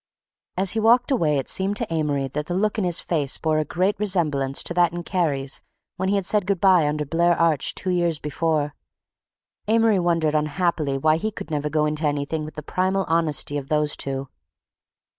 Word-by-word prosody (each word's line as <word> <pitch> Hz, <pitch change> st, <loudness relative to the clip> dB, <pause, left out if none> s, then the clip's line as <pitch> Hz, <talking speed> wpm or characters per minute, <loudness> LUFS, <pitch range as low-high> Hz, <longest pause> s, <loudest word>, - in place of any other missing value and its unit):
As 190 Hz, 0 st, +1 dB
he 225 Hz, -, -1 dB
walked 240 Hz, +4 st, +3 dB
away 160 Hz, -, +2 dB
it 135 Hz, -, -3 dB
seemed 195 Hz, +2 st, 0 dB
to 225 Hz, -8 st, -3 dB
Amory 145 Hz, -4 st, 0 dB
that 150 Hz, +3 st, -4 dB
the 175 Hz, -, -2 dB
look 215 Hz, +3 st, 0 dB
in -, -, 0 dB
his 175 Hz, -2 st, +1 dB
face 145 Hz, -5 st, -1 dB
bore 155 Hz, -1 st, 0 dB
a -, -, +1 dB
great 185 Hz, +7 st, -1 dB
resemblance 150 Hz, -9 st, 0 dB
to -, -, -3 dB
that 175 Hz, -1 st, +3 dB
in 175 Hz, 0 st, -5 dB
Kerry's 145 Hz, -8 st, -1 dB, 0.4 s
when 190 Hz, +1 st, -1 dB
he 200 Hz, -, +2 dB
had 195 Hz, -2 st, -1 dB
said 205 Hz, -1 st, +1 dB
good 200 Hz, -3 st, 0 dB
by 180 Hz, -5 st, +4 dB
under 150 Hz, 0 st, -2 dB
Blair 170 Hz, +3 st, +1 dB
Arch 165 Hz, -4 st, +1 dB
two 185 Hz, -, -1 dB
years 175 Hz, -3 st, +1 dB
before. 150 Hz, 0 st, -1 dB, 0.9 s
Amory 225 Hz, -2 st, +3 dB
wondered 165 Hz, -3 st, +1 dB
unhappily 150 Hz, -2 st, 0 dB
why 155 Hz, +3 st, +2 dB
he 215 Hz, +6 st, -2 dB
could 205 Hz, -, -9 dB
never 150 Hz, 0 st, -1 dB
go 150 Hz, 0 st, +1 dB
into 150 Hz, +1 st, 0 dB
anything 145 Hz, +2 st, -2 dB
with 155 Hz, -1 st, -9 dB
the 150 Hz, -, -7 dB
primal 190 Hz, +4 st, 0 dB
honesty 155 Hz, -3 st, +1 dB
of 135 Hz, -, -10 dB
those 150 Hz, 0 st, +1 dB
two. 135 Hz, 0 st, -3 dB
165 Hz, 200 wpm, -23 LUFS, 150-185 Hz, 0.9 s, by